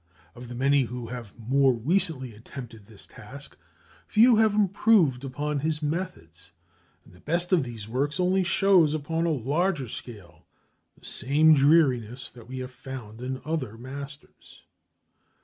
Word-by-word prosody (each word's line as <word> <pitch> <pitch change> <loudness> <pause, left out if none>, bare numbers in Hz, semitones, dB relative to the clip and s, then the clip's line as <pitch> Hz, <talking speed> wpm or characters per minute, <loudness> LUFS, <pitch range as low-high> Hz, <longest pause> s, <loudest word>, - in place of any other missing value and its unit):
Of 120 +1 -11
the 120 - -8
many 135 +1 +3
who 125 0 -6
have 120 -4 -8
more 130 +3 +2
recently 130 - 0
attempted 115 -1 -11
his 110 -3 -14
task, 140 +6 -11 0.5
few 230 +2 +5
have 220 -1 +3
improved 195 - +3
upon 145 +2 -3
his 155 +1 -2
methods; 120 - -5 0.5
and - - -19
the 90 - -18
best 175 - -1
of 180 - +5
these 115 -5 -7
works 140 +8 -2
only 185 +1 +2
shows 180 -4 +3
upon 160 +3 -1
a - - +1
larger 145 - 0
scale 105 -6 -10 0.5
the - - -17
same 150 +5 +3
dreariness 135 -5 +2
that 115 -2 -15
we 130 +1 -7
have 130 0 -6
found 125 -4 -9
in 130 +1 -5
other 140 -9 -3
masters. 140 +4 -11
135 Hz, 150 wpm, -26 LUFS, 120-160 Hz, 0.5 s, few